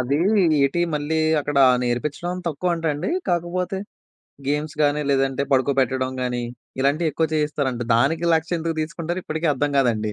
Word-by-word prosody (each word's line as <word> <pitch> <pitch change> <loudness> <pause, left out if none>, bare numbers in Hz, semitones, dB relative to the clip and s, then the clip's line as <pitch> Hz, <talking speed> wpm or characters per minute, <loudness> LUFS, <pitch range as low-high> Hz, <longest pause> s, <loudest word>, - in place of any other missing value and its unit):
అది 130 +3 0 0.5
ఏటీ? 140 +5 +1
మళ్ళీ 150 +2 -1 0.2
అక్కడ 145 -1 -1 0.2
నేర్పిచ్చడం 150 +9 -2
తక్కువంటండి. 165 - -1 0.2
కాకపోతే. 180 +2 -1 0.7
గేమ్స్ 150 +2 -1
గానీ, 145 0 +2
లేదంటే 135 0 +1
పడుకోపెట్టడం 130 -1 +1
గానీ 125 -1 -2 0.4
ఇలాంటివెక్కువ 155 +3 +1
చేయిస్తారంట. 145 -5 -1
దానికి 160 +8 +2
1,00,000 160 +1 -1
ఎందుకు 165 0 -3
తీసుకుంటారు 170 +2 -3
ఇప్పటికీ 160 +2 -2
అర్థం 145 +2 -1
గాదండి. 110 -5 +1
145 Hz, 125 wpm, -22 LUFS, 135-165 Hz, 0.7 s, గానీ